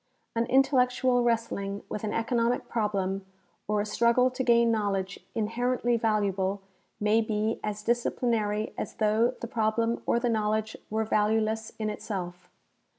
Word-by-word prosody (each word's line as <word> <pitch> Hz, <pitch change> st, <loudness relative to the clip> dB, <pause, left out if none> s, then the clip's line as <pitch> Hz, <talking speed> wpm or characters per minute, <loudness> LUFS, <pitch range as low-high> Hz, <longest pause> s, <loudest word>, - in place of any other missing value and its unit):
An 230 Hz, +1 st, +1 dB
intellectual 255 Hz, -1 st, +3 dB
wrestling 215 Hz, -4 st, -1 dB
Avith 210 Hz, -, -4 dB
an 210 Hz, -, -1 dB
economic 235 Hz, +1 st, 0 dB
problem 195 Hz, -4 st, -1 dB, 0.4 s
or 210 Hz, 0 st, +1 dB
a -, -, -2 dB
struggle 235 Hz, +4 st, +3 dB
to 255 Hz, +1 st, -2 dB
gain 235 Hz, -1 st, +4 dB
knowledge 200 Hz, -3 st, -1 dB, 0.2 s
inherently 240 Hz, +2 st, 0 dB
valuable 200 Hz, -3 st, 0 dB, 0.4 s
may 215 Hz, +2 st, +3 dB
be 220 Hz, 0 st, -1 dB
as 210 Hz, 0 st, -3 dB
dis 240 Hz, +1 st, +1 dB
ciplinary 215 Hz, -3 st, -1 dB
as -, -, -5 dB
though 220 Hz, +3 st, +2 dB
the 235 Hz, -, -3 dB
problem 230 Hz, +1 st, 0 dB
or 235 Hz, -, +3 dB
the 245 Hz, -, 0 dB
knowledge 220 Hz, -1 st, 0 dB
were 220 Hz, +1 st, 0 dB
value 215 Hz, +1 st, +2 dB
less 220 Hz, 0 st, -2 dB
in 215 Hz, -, -2 dB
itself. 180 Hz, -5 st, -6 dB
220 Hz, 150 wpm, -28 LUFS, 210-235 Hz, 0.4 s, gain